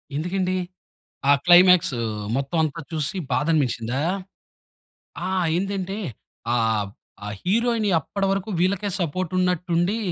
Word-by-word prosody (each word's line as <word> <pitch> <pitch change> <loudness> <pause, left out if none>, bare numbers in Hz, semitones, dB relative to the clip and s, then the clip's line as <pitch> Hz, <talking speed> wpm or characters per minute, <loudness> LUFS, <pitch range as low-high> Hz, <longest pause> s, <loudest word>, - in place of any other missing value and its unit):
ఎందుకండి? 185 +4 -1 0.7
ఆ - - +8
క్లైమాక్సూ 175 -6 +6 0.4
మొత్తం 140 +4 -2
అంతా 155 +1 -3
చూసి, 160 +5 -2
బాధ 145 - +1
అనిపించిందా? 125 -3 0 1.3
ఆ! - - -2 0.3
ఏందంటే 195 +1 -2 0.6
ఆహ్, 110 -3 +1 0.4
ఆ - - -4
హీరోయిన్ 230 +3 +1
అప్పటి 195 +6 -2
వరకు 195 +2 -2
వీళ్ళకే 195 +3 +1
సపోర్ట్ 175 +2 -2
ఉన్నట్టుండి, 180 +2 +1
180 Hz, 105 wpm, -23 LUFS, 150-195 Hz, 1.3 s, ఆ